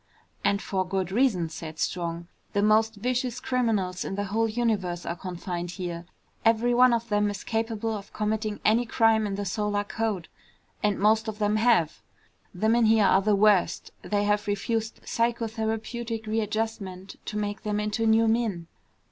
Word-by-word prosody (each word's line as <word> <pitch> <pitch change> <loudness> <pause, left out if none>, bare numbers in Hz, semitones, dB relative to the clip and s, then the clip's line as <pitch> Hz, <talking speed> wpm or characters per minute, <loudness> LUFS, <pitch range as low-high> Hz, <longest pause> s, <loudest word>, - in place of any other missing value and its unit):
"And 200 0 +1
for 190 -1 -1
good 190 0 -2
reason," 205 -7 +2
said 160 0 -8
Strong. 170 0 -2 0.3
"The 205 - +2
most 220 +1 +3
vicious 250 +3 -1
criminals 220 -9 0
in 195 - -4
the 205 - -1
whole 220 +3 0
universe 210 -7 -1
are 170 - -2
confined 175 -1 -5
here. 175 -2 -5 0.4
Every 230 +2 +3
one 250 +1 +6
of 235 0 -1
them 205 0 +2
is 205 -1 -5
capable 225 -1 -2
of 200 -1 -8
committing 215 0 -2
any 230 +3 +3
crime 225 -2 +3
in 200 - -3
the 200 0 -3
solar 205 +1 -1
code. 205 -4 -2 0.5
And 210 -2 +1
most 220 +3 +3
of 215 -1 -4
them 210 0 +1
have. 215 -9 +2 0.5
The 200 +5 -1
men 230 +1 +4
here 220 -1 +5
are 190 - +5
the 210 +1 +3
worst. 205 -2 +3
They 205 -1 0
have 210 0 +1
refused 220 +2 -2
psychotherapeutic 225 0 -2
readjustment 215 -3 -3
to 210 - -3
make 205 0 -3
them 210 -1 -1
into 210 +2 0
new 225 +1 +4
men." 220 -7 0
210 Hz, 165 wpm, -27 LUFS, 195-225 Hz, 0.5 s, one